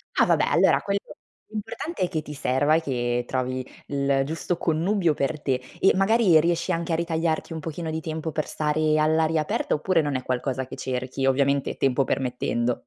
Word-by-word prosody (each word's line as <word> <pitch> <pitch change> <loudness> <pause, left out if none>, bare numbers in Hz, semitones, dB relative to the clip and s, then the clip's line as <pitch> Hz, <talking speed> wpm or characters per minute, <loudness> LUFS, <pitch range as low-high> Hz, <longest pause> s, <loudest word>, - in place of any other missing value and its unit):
Ah, - - +5
vabbè, - - +3
allora, - - +4
quello, 200 0 -1 0.5
l'importante 220 - -5
è - - +2
che 160 -4 -2
ti 150 - -8
serva 140 +3 +2
e 165 - +2
che 120 -4 -1
trovi 130 0 -2 0.2
il 140 -1 +1
giusto 165 +3 -2
connubio 170 +1 +1
per 145 +2 -2
te 130 -2 0 0.2
e 190 - +5
magari 195 -4 +5
riesci 170 +1 0
anche 170 0 -2
a - - +3
ritagliarti 165 -1 -1
un 160 - -4
pochino 160 +1 -5
di 160 0 -3
tempo 160 -1 -4
per 155 0 -2
stare 155 0 +1
all'aria 160 0 +2
aperta 150 - -1
oppure 165 +2 +2
non 145 -2 -2
è 130 - -2
qualcosa 130 +1 -2
che - - -9
cerchi, 130 +1 -3
ovviamente, 140 +1 +1
tempo 135 0 +2
permettendo? 125 -2 -1
155 Hz, 185 wpm, -25 LUFS, 135-165 Hz, 0.5 s, Ah